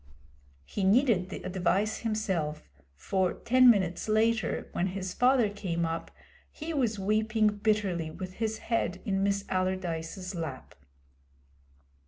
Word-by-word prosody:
He 200 - -4
needed 200 -2 +3
the - - -7
advice 190 +3 0
himself, 190 -9 -2 0.3
for 185 - 0
ten 255 +1 +5
minutes 190 -3 +2
later, 220 +1 +1
when 180 - 0
his 185 -1 -4
father 250 -2 +4
came 185 -5 -2
up, 165 0 -3 0.4
he 325 +2 -6
was 240 -7 0
weeping 215 +2 +2
bitterly 205 -5 0
with 185 +3 -7
his 220 -1 0
head 230 - 0
in 195 -3 0
Miss 200 0 0
Allardyce's 185 0 -2
lap. 160 -7 -6
195 Hz, 125 wpm, -29 LUFS, 180-220 Hz, 0.4 s, ten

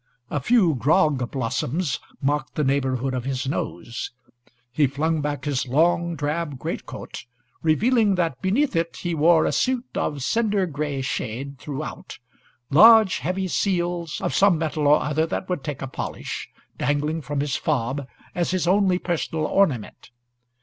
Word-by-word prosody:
A 145 - 0
few 185 - +3
grog 140 -2 +2
blossoms 130 +3 -2 0.2
marked 145 +1 -1
the 150 - 0
neighbourhood 135 -1 0
of 125 -2 -2
his 130 0 -2
nose. 115 -4 -4 0.6
He 145 +3 +3
flung 155 +4 -1
back 145 -1 -3
his 135 -3 -1
long 170 +5 +2
drab 150 -1 -2
greatcoat, 120 - -6 0.4
revealing 210 +6 +3
that 165 -7 -1
beneath 225 +6 +1
it 165 0 -1
he 175 -1 -3
wore 160 +1 +4
a - - +1
suit 255 -1 0
of 145 -3 -2
cinder 210 - +1
gray 145 -4 -3
shade 130 +3 -4
throughout, 150 +2 -6 0.5
large, 220 +5 +7
heavy 185 +7 -2
seals, 175 -3 -1
of - - -1
some 195 -4 +4
metal 155 -2 -1
or 150 +1 +5
other 155 +2 0
that 185 - -3
would 180 -6 -2
take 145 -3 -5
a - - -3
polish, 130 - -5 0.3
dangling 150 +3 0
from 145 +1 -3
his 145 -1 -1
fob 135 -1 -1 0.3
as 175 -1 -1
his 185 -2 0
only 190 -1 +3
personal 165 -3 -2
ornament. 150 - 0
155 Hz, 150 wpm, -24 LUFS, 135-175 Hz, 0.6 s, large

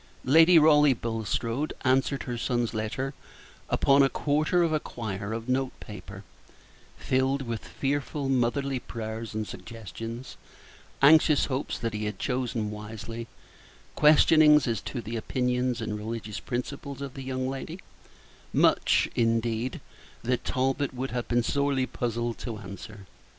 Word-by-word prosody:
Lady 165 +5 +7
Raleigh 150 -3 +6
Bulstrode 115 +4 -2
answered 135 +1 +1
her 120 - -4
son's 120 0 -1
letter 115 +5 -3 0.6
upon 140 +1 +4
a 135 - +5
quarter 155 +6 +1
of 165 -2 +1
a 155 - +2
quire 105 -6 -5
of 115 +1 -4
note 130 0 -1
paper, - - -10 0.7
filled 135 +1 0
with 115 -3 -4
fearful 140 0 -2
motherly 135 +1 +1
prayers 110 -1 -6
and 110 -1 -2
suggestions; 115 +2 -8 0.7
anxious 155 0 +6
hopes 135 0 -3
that 115 -1 -3
he 105 0 -3
had 105 - -3
chosen 125 -5 -2
wisely; 110 +2 -7 0.7
questionings 150 -1 +6
as 115 -2 -1
to 125 - -5
the 115 +2 -6
opinions 125 +1 -1
and 110 -1 -3
religious 110 -1 -5
principles 140 +2 -5
of 135 -2 -6
the 135 - -7
young 130 0 -3
lady 135 +5 -5 0.7
much, - - +3
indeed, 115 +1 0 0.4
that 125 +1 0
Talbot 135 +1 -1
would 130 0 -3
have 120 0 -3
been 120 0 +2
sorely 140 0 +1
puzzled 120 -2 -3
to 115 -4 -5
answer. 100 0 -10
125 Hz, 135 wpm, -27 LUFS, 115-140 Hz, 0.7 s, Lady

